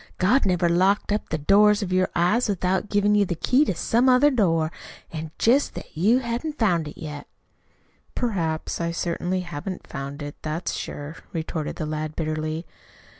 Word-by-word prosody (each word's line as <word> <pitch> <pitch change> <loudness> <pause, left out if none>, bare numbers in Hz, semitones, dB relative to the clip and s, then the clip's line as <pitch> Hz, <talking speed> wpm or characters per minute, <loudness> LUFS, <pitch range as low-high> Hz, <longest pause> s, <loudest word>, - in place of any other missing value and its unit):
God 210 +6 +3
never 180 -2 +2
locked 190 +5 +2
up 210 - -1
the 155 - -1
doors 205 +6 +4
of 185 -2 -3
your 185 0 +2
eyes 210 +8 +2
without 190 +1 0
givin' 205 0 +3
you 205 -1 +4
the 175 -3 -2
key 255 - +3
to 190 - -1
some 240 +9 +2
other 260 +4 +5
door. 165 - +2 0.4
It's 160 -1 -5
jest 260 +5 +3
that - - -9
you 205 +10 +4
hain't 260 +5 -3
found 175 -8 +2
it 150 - -10
yet." 150 -2 -7 0.9
"Perhaps. 170 -10 -1
I 170 - 0
certainly 175 +2 -2
haven't 175 +2 -6
found 140 +2 -6
it 145 0 -7
that's 155 +3 -3
sure," 145 +2 -6 0.2
retorted 160 -1 -3
the 155 - -4
lad 155 0 -4
bitterly. 155 +1 -3
180 Hz, 175 wpm, -24 LUFS, 155-210 Hz, 0.9 s, other